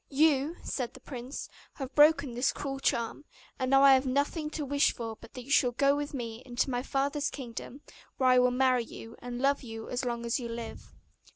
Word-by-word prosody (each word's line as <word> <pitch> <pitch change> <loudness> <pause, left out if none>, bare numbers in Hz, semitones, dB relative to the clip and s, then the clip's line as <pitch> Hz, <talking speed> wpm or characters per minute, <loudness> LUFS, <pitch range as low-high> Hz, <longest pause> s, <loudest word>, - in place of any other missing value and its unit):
'You,' 295 +1 +3
said 250 -3 -3
the - - -11
prince, 255 0 -7 0.3
'have 270 -1 -6
broken 295 -4 +5
his 250 +2 +2
cruel 270 -1 -5
charm, 235 +1 -1 0.4
and 255 - 0
now 270 +1 +6
I 275 -1 +9
have 265 0 +3
nothing 285 +4 0
to 305 -1 -4
wish 285 +1 +3
for 225 -2 -5
but - - -14
that 250 - -6
you 275 - -9
should 245 -4 +3
go 280 0 +4
with 290 0 -3
me 235 -4 -5
into 255 +1 -1
my 245 0 0
father's 280 +2 -1
kingdom, 255 +1 -8 0.4
where 260 -1 +3
I 255 0 +6
will 250 0 +5
marry 255 -1 +2
you, 225 0 -10
and 245 0 -6
love 275 +2 +2
you 225 -3 -8
as 250 - -2
long 235 -1 -2
as 235 +3 0
you 235 -2 -5
live. 230 0 -7
260 Hz, 215 wpm, -30 LUFS, 245-280 Hz, 0.4 s, I